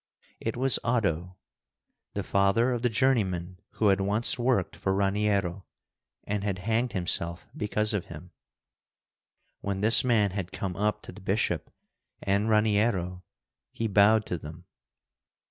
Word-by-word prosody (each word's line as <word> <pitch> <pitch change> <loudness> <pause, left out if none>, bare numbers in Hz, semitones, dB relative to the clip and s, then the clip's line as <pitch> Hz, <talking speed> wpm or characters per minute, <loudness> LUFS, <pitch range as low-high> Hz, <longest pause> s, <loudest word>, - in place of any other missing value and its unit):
It 115 +1 -4
was 130 0 +2
Oddo, 95 -7 -1 0.8
the - - -2
father 100 +6 +2
of 120 -2 -2
the 125 - +2
journeyman 95 -8 0
who 105 - +2
had 95 0 +2
once 105 +6 +1
worked 120 -6 0
for 95 0 -1
Raniero, 100 -2 0 0.6
and 105 -1 -3
had 100 -2 -2
hanged 115 +2 0
himself 85 -2 0
because 105 +1 0
of 100 -4 -2
him. - - -11 1.3
When 100 -1 -3
this 110 +2 +7
man 110 -6 +2
had 95 -2 -5
come 95 -2 -4
up 105 +1 -1
to - - -9
the - - -13
bishop - - -1 0.5
and 100 +3 0
Raniero, 105 -4 +1 0.5
he 115 - -3
bowed 105 +1 +4
to 90 - -4
them. 80 +4 -11
100 Hz, 140 wpm, -27 LUFS, 95-110 Hz, 1.3 s, this